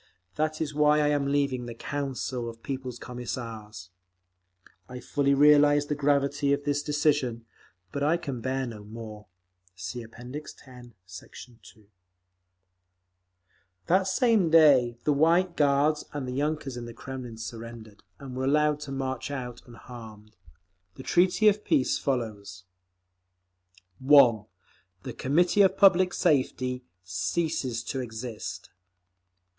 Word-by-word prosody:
That 155 0 -1
is 150 -2 -3
why 150 0 +4
I 150 -1 +2
am 145 -1 0
leaving 140 -3 0
the 120 - -7
Council 130 -2 -4
of 115 0 -13
People's 130 -3 -5
Commissars. 115 -6 -7 1.0
I 125 0 -7
fully 140 +3 +1
realise 145 0 +5
the 150 - -2
gravity 140 0 +1
of 140 0 -2
this 145 0 0
decision. 145 -6 0 0.5
But 140 - -4
I 155 +4 +2
can 135 -7 -6
bear 130 +2 -2
no 110 -4 -8
more…. 105 -1 -10 0.5
(See 95 +6 -6
App. 115 - -15
X, 125 +6 -8 0.5
Sect. 95 +6 -11
2) 110 -2 -18 2.0
That 190 +2 +2
same 210 -3 +2
day 140 -7 +5
the 150 - +2
White 170 +4 +3
Guards 145 +1 +2
and 140 -3 -4
yunkers 145 -2 -2
in 120 - -6
the 120 -1 -10
Kremlin 130 -4 -8
surrendered, 115 -2 -9 0.2
and 135 -2 -9
were 130 +1 -2
allowed 150 +1 +2
to 150 -2 -8
march 130 -1 -3
out 125 -4 -6
unharmed. 110 -3 -12 0.6
The 130 - -10
treaty 185 +7 +3
of 210 0 +3
peace 130 - +1
follows: 105 -8 -3 1.4
1. 130 -6 +5 0.6
The - - -6
Committee 175 +9 +2
of 195 - +4
Public 185 -2 +5
Safety 130 -2 0 0.2
ceases 115 - -2
to 135 - -4
exist. 115 -2 -6
135 Hz, 130 wpm, -27 LUFS, 120-150 Hz, 2.0 s, realise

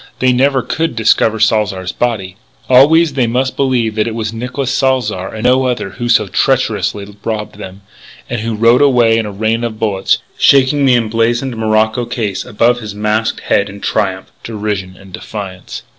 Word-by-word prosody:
They 130 0 +2
never 135 0 +2
could 165 -4 -2
discover 110 0 +2
Salzar's 105 -4 0
body. 100 -6 -2 0.3
Always 150 +5 +5
they 130 -3 +1
must 130 +3 -1
believe 125 -5 0
that 110 +1 0
it 115 - -4
was 110 -1 -3
Nicolas 125 +3 -3
Salzar 125 -8 0
and 110 0 -7
no 130 +1 +3
other 120 -6 -3
who 120 +5 -5
so 110 -2 +4
treacherously 105 -4 -1
robbed 105 -2 -4
them, 95 0 -10 0.4
and 120 -2 -3
who 115 0 -3
rode 115 +4 +4
away 120 -5 +4
in 110 - -2
a - - -6
rain 110 +3 -1
of 115 -2 -4
bullets, 100 -4 0 0.2
shaking 140 +1 +4
the 125 - +5
emblazoned 120 +2 0
morocco 110 +1 +1
case 110 -5 -3
above 120 +1 +1
his 105 -3 -8
masked 105 +1 -1
head 100 - 0
in 100 +1 -10
triumph, 95 -2 -2
derision 105 -4 -4
and 95 -2 -16
defiance. 95 -3 -7
115 Hz, 175 wpm, -14 LUFS, 105-125 Hz, 0.4 s, Always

